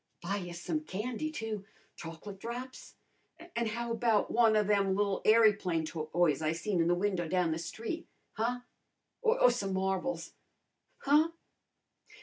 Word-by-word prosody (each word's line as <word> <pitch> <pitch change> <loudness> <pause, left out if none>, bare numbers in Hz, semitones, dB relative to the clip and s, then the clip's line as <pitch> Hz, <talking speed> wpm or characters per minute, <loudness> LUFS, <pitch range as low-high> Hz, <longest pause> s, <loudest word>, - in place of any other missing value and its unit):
"Buy 195 +4 -1
ya 175 -3 -6
some 175 - -2
candy, 250 +2 -3
too. 225 -8 -4 0.3
Choc'late 170 +4 -8
drops! 245 +4 -7 0.6
An' 235 -1 0
how 235 +2 -3
about 230 -2 +2
one 225 -2 +5
o' 210 - +4
them 200 -2 +2
li'l 200 -1 0
airyplane 205 -7 +4
toys 155 -1 0
I 155 0 +1
seen 175 +1 0
in 165 - +2
the 175 - +3
window 180 -2 0
down 180 -1 +1
the 160 - -1
street? 225 - -5 0.3
Huh? 240 +3 -1 0.6
Or - - +5
some 195 -1 -2
marbles? 190 +7 -1 0.7
Huh? 300 +3 +5
205 Hz, 140 wpm, -32 LUFS, 175-235 Hz, 0.7 s, one